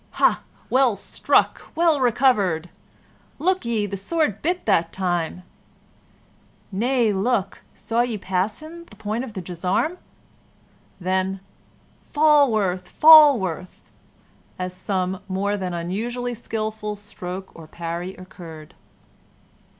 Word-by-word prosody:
"Hah! - - +3 0.3
well 255 -4 +4
struck! - - 0
well 330 -3 +3
recovered!" 215 -10 +2 0.7
"Look 370 0 0
ye! 225 -3 0
the 200 -1 -4
sword 215 - -1
bit 355 +3 -1
that 170 -5 +2
time!" 180 -1 -2 1.3
"Nay, 230 +2 +1
look, 200 0 -1
saw 230 +1 -1
ye 240 -2 -1
him - - -6
pass 190 +5 -1
the 330 -5 -11
point 220 +3 -3
of 245 -5 -8
the 190 - -5
gisarm?" 180 - -1 1.0
Then, 190 +1 -1 0.7
"Falworth! 225 - +3
Falworth!" 265 - +5 0.7
as 180 -1 -4
some 185 0 -2
more 200 +2 -1
than 175 -3 -4
usually 240 +4 -3
skilful 215 -2 -4
stroke 190 -2 -8
or 165 -2 -12
parry 170 +3 -5
occurred. 165 -4 -11
205 Hz, 110 wpm, -23 LUFS, 185-245 Hz, 1.3 s, Falworth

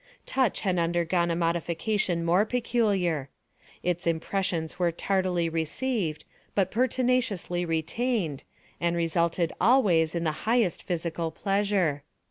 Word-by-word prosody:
Touch 260 -4 +1
had 185 -4 +1
undergone 170 +1 +1
a 170 - +1
modification 170 +2 0
more 175 +4 +4
peculiar. 205 - 0 0.5
Its 175 -1 -1
impressions 165 0 -1
were 175 -1 +2
tardily 180 -1 0
received, 165 - -2 0.3
but 190 -2 +2
pertinaciously 245 -8 0
retained, 165 - -1 0.4
and 170 0 +1
resulted 170 0 0
always 180 -8 +4
in 170 - -1
the 160 - +1 0.2
highest 230 -8 +2
physical 170 -2 -2
pleasure. 195 -5 0
175 Hz, 110 wpm, -27 LUFS, 165-205 Hz, 0.5 s, more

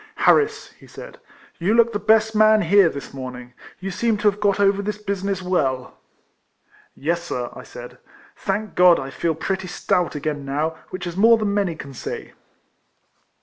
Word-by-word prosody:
" - - -40
Harris," 440 0 +3
he - - -16
said, - - -11 0.2
" - - -27
you 190 +6 +1
look 235 0 +4
the 205 - -1
best 220 +1 +3
man 215 0 +5
here, 200 -4 +5
this 140 -2 -8
morning. 125 -2 -8 0.3
You 195 +1 -5
seem 225 +3 0
to 210 0 +3
have 200 - -14
got 205 -1 +1
over 200 0 +3
this 210 +1 -3
business 200 -2 -3
well." 135 -9 -1 0.4
" - - -43 0.2
Yes, 170 +4 -1
Sir," 125 -7 -4
I - - -9
said, - - -11 0.2
" - - -26
thank 215 0 -3
God 180 -1 +6
I 135 0 -6
feel 165 +3 -1
pretty 190 +3 -3
stout 175 -1 -1
again 145 -1 -3
now, 150 +4 -2
which 185 0 -6
is 175 -1 -5
more 225 +4 +6
than 210 -2 -1
many 200 -5 0
can 140 -3 -9
say." - - -7
190 Hz, 190 wpm, -22 LUFS, 160-210 Hz, 0.4 s, God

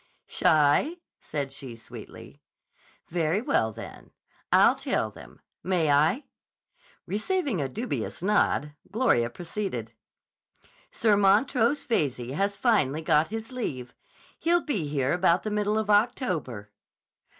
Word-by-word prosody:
"Shy?" 155 - +3 0.2
said 140 -2 -4
she, 130 -4 -8
sweetly. 115 - -12 0.7
"Very 165 +2 +1
well, 110 - +1
then. - - -10 0.4
I'll - - +6
tell - - -2
them. - - -14 0.2
May 170 -4 +1
I?" 155 - +3 0.8
Receiving 245 - -1
a 135 - -2
dubious 225 - -4
nod, 185 -7 +1 0.2
Gloria 205 - +2
proceeded: 165 - -5 1.0
"Sir 215 -2 +2
Montrose 225 +7 +3
Veyze 130 - -1
has 200 +5 -1
finally 160 - +2
got 155 0 +3
his 225 +2 -6
leave. 135 - -5 0.5
He'll 345 +1 +3
be 205 - -1
here 140 -2 0
about 175 0 +2
the 215 - -3
middle 210 0 0
of 215 -1 0
October." 180 - 0
180 Hz, 115 wpm, -27 LUFS, 145-220 Hz, 1.0 s, I'll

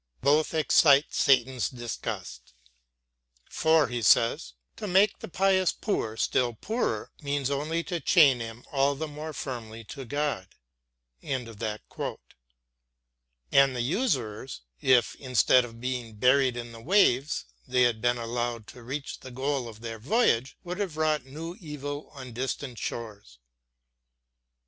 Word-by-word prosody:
Both 150 +3 +2
excite 145 -2 +5
Satan's 130 -2 +2
disgust. 115 - -6 1.0
"For," 160 -2 +3
he 120 0 -3
says, 115 - +3 0.2
"to 210 - -5
make 195 +2 +3
the - - -7
pious 190 +1 +2
poor 115 - -2
still 120 -1 +1
poorer 225 - -2
means 140 -2 -1
only 155 +4 -1
to 175 -2 -3
chain 140 -4 +5
him 115 +1 -7
all 140 0 +2
the 160 +3 -4
more 150 +1 -7
firmly 115 -6 -6
to 140 - -7
God"; 145 -7 -2 0.7
and 130 -3 -3
the 110 -1 -4 2.0
usurers, 130 - -1 0.2
if, 125 -2 +4
instead 130 -1 +4
of 115 -1 -10
being 125 -3 -4
buried 125 +2 +3
in 120 -1 -6
the 115 0 -11
waves, 150 - +3 0.2
they 125 0 +3
had 115 -3 +1
been 120 0 +2
allowed 120 -1 -3
to 125 - -12
reach 135 +4 -5
the 130 - -10
goal 130 0 -2
of 110 -1 -11
their 115 -1 -6
voyage, 130 - +1
would 180 +2 -5
have 185 -7 -3
wrought 155 -3 +1
new 165 +5 -7
evil 145 -2 -6
on 130 -3 -9
distant 130 0 -4
shores. 105 - -6
130 Hz, 135 wpm, -27 LUFS, 120-150 Hz, 2.0 s, excite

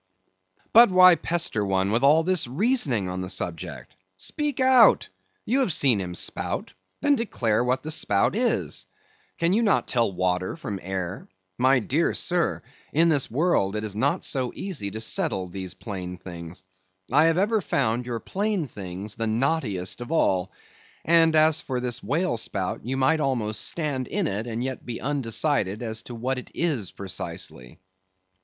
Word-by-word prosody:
But 235 0 +8
why 185 -1 +8
pester 165 -10 -1
one 95 0 0
with 115 +2 +2
all 155 +4 +5
this 180 -5 +2
reasoning 140 - +2
on 90 0 -4
the 90 - -5
subject? 85 -4 -5 0.2
Speak 285 - -3
out! 260 -4 +5 0.4
You 255 +5 +1
have 255 -9 +1
seen 130 -9 +4
him 90 -1 -5
spout; - - -2 0.3
then 290 - +4
declare 120 - 0
what 125 +1 0
the 155 - -4
spout 105 - +1
is; 240 +2 -1 0.5
can 170 +2 +2
you 220 - +3
not 210 -4 +2
tell 115 -6 +1
water 90 0 -1
from 100 -2 -5
air? 95 0 -5 0.3
My 130 +2 +4
dear 140 +7 0
sir, 175 -1 0 0.3
in 165 +3 +3
this 145 -5 +2
world 125 - +1
it 105 - -2
is 105 -2 -4
not 135 +7 0
so 130 -3 -1
easy 165 - -4
to 110 +3 -6
settle 110 - -1
these 95 0 -6
plain 90 -4 -6
things. 85 0 -9 0.5
I 150 +4 +5
have 165 0 +3
ever 210 +3 +2
found 125 -6 0
your 120 -2 -3
plain 200 - -2
things 100 -3 -6
the 115 0 -3
knottiest 110 - -1
of 120 - -7
all. 95 - +1 0.5
And 165 -1 +5
as 155 +1 +4
for 130 -6 -3
this 125 -1 -2
whale 165 -2 -1
spout, 95 -4 -3
you 130 +4 -3
might 135 +4 +3
almost 120 -7 -1
stand 145 -6 -2
in - - -1
it, 105 +4 -2
and 115 +1 -3
yet 130 0 -4
be 120 -2 -6
undecided 125 -5 -1
as 110 -1 -3
to 120 - -6
what 130 +3 -2
it - - -12
is 145 - -1
precisely. 75 -9 -6
125 Hz, 170 wpm, -25 LUFS, 100-165 Hz, 0.5 s, But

